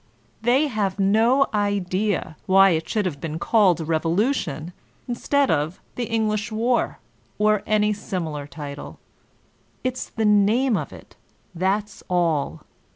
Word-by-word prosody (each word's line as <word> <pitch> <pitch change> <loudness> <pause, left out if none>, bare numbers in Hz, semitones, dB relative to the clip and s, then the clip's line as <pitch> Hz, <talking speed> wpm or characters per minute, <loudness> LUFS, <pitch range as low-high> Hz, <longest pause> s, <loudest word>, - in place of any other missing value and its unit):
They 250 +6 +3
have 210 -8 -1
no 225 +8 +4
idea 200 -3 -1
why 195 0 +6
it 160 -1 -1
should 210 -2 0
have 145 -6 -3
been 160 -1 -4
called 190 -1 +3
a 160 - -4
"revolution" 165 - -1 0.3
instead 275 +3 +1
of 155 +3 -1
the 245 - -3
"English 220 -1 -1
war/' 235 +3 0 0.4
or 210 -1 +3
any 210 0 +2
similar 160 -8 -4
title: 145 -1 -8 0.9
it's 255 0 -3
the 225 - -2
name 210 +5 +3
of - - -3
it, - - -14 0.4
that's 195 +4 -1
all. 170 -5 0
205 Hz, 130 wpm, -23 LUFS, 170-225 Hz, 0.9 s, why